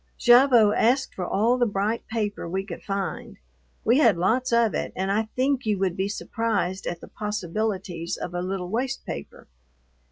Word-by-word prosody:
Gavotte 240 Hz, -4 st, +6 dB
asked 260 Hz, +4 st, +2 dB
for 180 Hz, -2 st, -4 dB
all 235 Hz, +5 st, +2 dB
the 245 Hz, -, +3 dB
bright 205 Hz, +3 st, -2 dB
paper 210 Hz, -6 st, -3 dB
we 190 Hz, +2 st, -2 dB
could 180 Hz, -4 st, -8 dB
find. 195 Hz, -1 st, -4 dB, 0.5 s
We 240 Hz, +5 st, +4 dB
had 230 Hz, -, +5 dB
lots 245 Hz, +9 st, +1 dB
of 235 Hz, -2 st, +3 dB
it, -, -, -2 dB
and 190 Hz, +1 st, -1 dB
I 220 Hz, +2 st, 0 dB
think 265 Hz, 0 st, +1 dB
you 210 Hz, -2 st, +2 dB
would 190 Hz, -2 st, 0 dB
be 190 Hz, +1 st, -1 dB
surprised 205 Hz, -3 st, -2 dB
at 175 Hz, -1 st, -4 dB
the -, -, -10 dB
possibilities 195 Hz, -4 st, -3 dB
of 175 Hz, -, -6 dB
a 175 Hz, -, -2 dB
little 185 Hz, -1 st, -3 dB
waste 255 Hz, +6 st, -2 dB
paper. 70 Hz, +1 st, -8 dB
210 Hz, 180 wpm, -25 LUFS, 190-235 Hz, 0.5 s, Gavotte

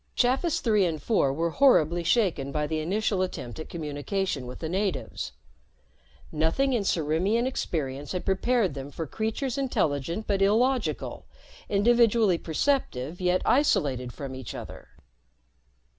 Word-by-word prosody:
Chafis 280 Hz, +7 st, +1 dB
Three 215 Hz, -4 st, +3 dB
and 165 Hz, -4 st, -1 dB
Four 145 Hz, -, +2 dB
were 165 Hz, +4 st, -1 dB
horribly 175 Hz, -, +4 dB
shaken 170 Hz, -, +1 dB
by 150 Hz, +1 st, -1 dB
the 155 Hz, +1 st, -2 dB
initial 195 Hz, +4 st, 0 dB
attempt 160 Hz, -9 st, -4 dB
at 155 Hz, -, -7 dB
communication 155 Hz, -1 st, -3 dB
with 125 Hz, -, -7 dB
the 160 Hz, -, -4 dB
natives. 150 Hz, -, -2 dB, 1.0 s
Nothing 165 Hz, -, +1 dB
in 235 Hz, -, +1 dB
Ciriimian 185 Hz, +6 st, +1 dB
experience 145 Hz, -, -3 dB
had 180 Hz, -, -3 dB
prepared 195 Hz, -, +1 dB
them 135 Hz, 0 st, -6 dB
for 160 Hz, +3 st, -5 dB
creatures 225 Hz, -, -2 dB
intelligent 175 Hz, -, -1 dB
but 195 Hz, -1 st, 0 dB
illogical, 245 Hz, +6 st, +1 dB, 0.4 s
individually 220 Hz, -3 st, +4 dB
perceptive 165 Hz, -, -1 dB
yet 180 Hz, 0 st, +2 dB
isolated 135 Hz, -, +2 dB
from 135 Hz, +1 st, -7 dB
each 130 Hz, -4 st, -7 dB
other. -, -, -9 dB
180 Hz, 130 wpm, -27 LUFS, 150-225 Hz, 1.0 s, horribly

